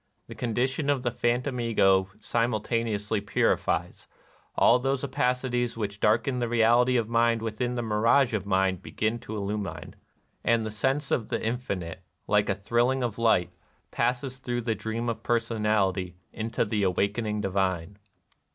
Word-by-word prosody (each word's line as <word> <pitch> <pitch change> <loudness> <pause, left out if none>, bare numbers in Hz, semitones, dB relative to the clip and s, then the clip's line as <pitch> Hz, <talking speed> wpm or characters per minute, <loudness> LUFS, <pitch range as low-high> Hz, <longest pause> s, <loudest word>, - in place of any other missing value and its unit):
Tlie - - -9
condition 130 +5 -1
of 140 -3 +1
the 120 - 0
phantom 120 +2 -1
Ego 95 -5 +3
simultaneously 110 -2 -1
purifies: 100 - 0 0.5
all 125 - +5
those 135 +1 -1
opa 125 0 +1
cities 120 -2 -2
which 100 -2 -4
darkened 120 +5 +2
the 120 - -1
reality 120 +2 +4
of 115 -2 0
Mind 115 0 +2
within 120 +3 -2
the 120 - -2
mirage 115 +4 +3
of 110 - -1
mind 95 -2 +1
begin 110 +4 -2
to 110 -1 -6
illumine; 100 0 -4 0.5
and 115 -1 +2
the 110 - -4
sense 135 +6 -1
of 110 - 0
the - - -1
infinite, 100 -8 -3 0.2
like - - +2
a - - +2
thrilling 120 +6 +1
of 115 -2 -3
light, 90 -7 +3 0.4
passes 125 +2 -1
through 120 -2 -2
the 115 -1 0
dream 110 +2 -4
of 115 - -2
personality 105 -6 0 0.2
into 115 +1 -1
the 105 -1 -1
awakening 100 +3 0
divine. 95 -1 -1
115 Hz, 150 wpm, -27 LUFS, 105-120 Hz, 0.5 s, all